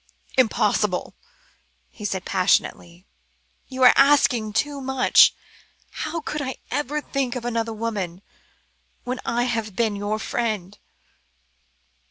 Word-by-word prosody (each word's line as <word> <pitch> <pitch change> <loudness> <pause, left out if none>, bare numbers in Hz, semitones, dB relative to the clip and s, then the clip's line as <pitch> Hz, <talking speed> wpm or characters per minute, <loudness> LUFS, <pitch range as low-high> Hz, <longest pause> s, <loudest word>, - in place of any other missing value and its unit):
"Impossible," 210 -6 +1 0.8
he 210 - -12
said 190 -2 -3
passionately. 180 -1 0 0.6
"You 260 -1 -2
are 250 - +9
asking 260 -6 +4
too 280 +5 -1
much. 265 -1 +4 0.6
How 325 +2 -4
could 300 0 -4
I 260 -2 -4 0.2
ever 290 +2 -2
think 270 -4 -2
of 245 -1 -5
another 230 -1 -1
woman, 205 -5 -4 0.8
when 250 +1 -4
I 240 +1 +1
have 225 -5 -2
been 220 -2 0
your 205 +1 -2
friend?" 215 -4 -3
230 Hz, 115 wpm, -23 LUFS, 205-260 Hz, 0.8 s, are